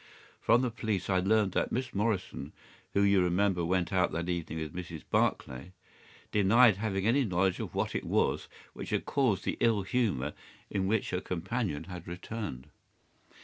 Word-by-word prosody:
"From 120 +3 +4
the 125 - 0
police 110 -5 -2
I 95 - +3
learned 100 +1 +2
that - - 0
Miss 125 +1 -2
Morrison, 100 -1 -2 0.4
who 100 - +4
you 100 -1 +5
remember 90 0 +2
went 90 +1 0
out 90 -2 +2
that 85 +1 -2
evening 85 -2 -3
with 80 -2 -4
Mrs. 85 -3 -6
Barclay, 65 +8 0 0.6
denied 105 +1 +5
having 100 -2 -1
any 130 +5 +4
knowledge 95 -3 +1
of - - -5
what - - -1
it - - -2
was - - +1 0.3
which - - -7
had - - -1
caused 125 -9 +1
the - - -1
ill 110 -4 +3
humour 95 - 0 0.4
in 95 -2 0
which 110 +1 0
her 90 - -1
companion 90 -3 -2
had 90 -1 -9
returned. 90 - -6
95 Hz, 170 wpm, -30 LUFS, 90-110 Hz, 0.6 s, you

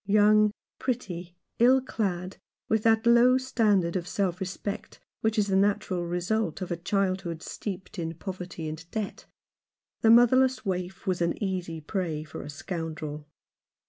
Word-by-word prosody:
Young, 210 +1 +5 0.3
pretty, 180 -8 -3 0.2
ill 255 +3 +6
clad, 190 -7 -3 0.3
with 220 -1 +2
that 225 0 +3
low 240 +2 +6
standard 210 -9 +2
of 175 -2 -2
self 185 -3 -1
respect 190 +2 -5 0.2
which 220 0 0
is 210 - +4
the 195 -1 0
natural 190 -3 +1
result 180 +1 -1
of 185 -1 -5
a - - +1
childhood 185 -2 -1
steeped 190 -1 -6
in 165 0 -3
poverty 180 -2 -6
and 155 +1 -6
debt, 215 -1 -4 0.8
the 225 - +4
motherless 250 +2 +5
waif 185 -1 -3
was 185 -2 0
an 170 - +1
easy 180 -5 -3
prey 160 -2 -2
for 155 - -8
a - - -8
scoundrel. 155 -1 -5
190 Hz, 145 wpm, -28 LUFS, 175-220 Hz, 0.8 s, ill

